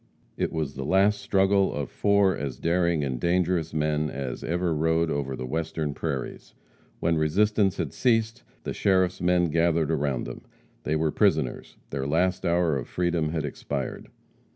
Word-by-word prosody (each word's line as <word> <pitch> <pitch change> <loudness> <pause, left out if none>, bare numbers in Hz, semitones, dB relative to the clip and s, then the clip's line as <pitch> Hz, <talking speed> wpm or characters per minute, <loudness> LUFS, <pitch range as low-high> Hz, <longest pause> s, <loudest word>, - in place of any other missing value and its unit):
It - - -1
was 75 -4 -2
the 65 - -5
last 95 +7 +3
struggle 95 0 +2
of 70 -2 -4
four 100 -2 +3
as 70 -3 -4
daring 85 -1 +1
and 65 -3 -2
dangerous 85 0 +1
men 75 0 0
as 65 -4 -5
ever 85 0 0
rode 80 +1 +1
over 70 -2 -2
the 65 - -5
Western 80 +1 -2
prairies. 70 -4 -5 0.4
When 85 -1 +1
resistance 100 +5 +2
had - - -3
ceased, 115 -1 +1 0.2
the - - -3
sheriff's 95 -3 +1
men 90 -2 +2
gathered 85 -1 +2
around 70 -5 0
them. - - -7 0.4
They 75 - 0
were 80 0 +1
prisoners; - - 0
their 70 -1 -2
last 90 +4 +1
hour 85 -2 +2
of 65 - -7
freedom 85 -3 0
had 80 -1 -2
expired. 70 -1 -5
80 Hz, 160 wpm, -26 LUFS, 75-90 Hz, 0.4 s, last